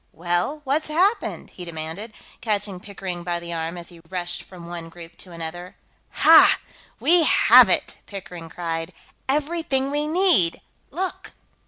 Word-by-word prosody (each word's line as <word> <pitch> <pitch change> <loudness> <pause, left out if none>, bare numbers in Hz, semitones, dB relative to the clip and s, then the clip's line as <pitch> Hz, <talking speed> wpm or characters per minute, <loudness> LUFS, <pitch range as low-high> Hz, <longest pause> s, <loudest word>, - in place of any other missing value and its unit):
"Well, 175 - -2
what's 290 +3 -1
happened?" 365 +9 0
he 180 - -10
demanded, 170 +6 -7 0.3
catching 205 -4 -2
Pickering 185 -3 -6
by 175 0 -2
the 170 0 -7
arm 165 +1 -4
as 170 0 -9
he 170 -2 -15
rushed 175 -1 -4
from 180 -3 -13
one 170 -1 -7
group 165 0 -12
to 185 - -10
another. 170 +2 -7 0.3
"Ha! - - +6 0.4
We 345 +1 +6
have - - +7
it!" - - +1
Pickering 180 -4 -8
cried. 165 -1 -4 0.4
"Everything 285 -2 0
we 295 +1 -1
need! 315 - +3 0.3
Look!" 365 +4 -5
180 Hz, 145 wpm, -23 LUFS, 170-275 Hz, 0.4 s, have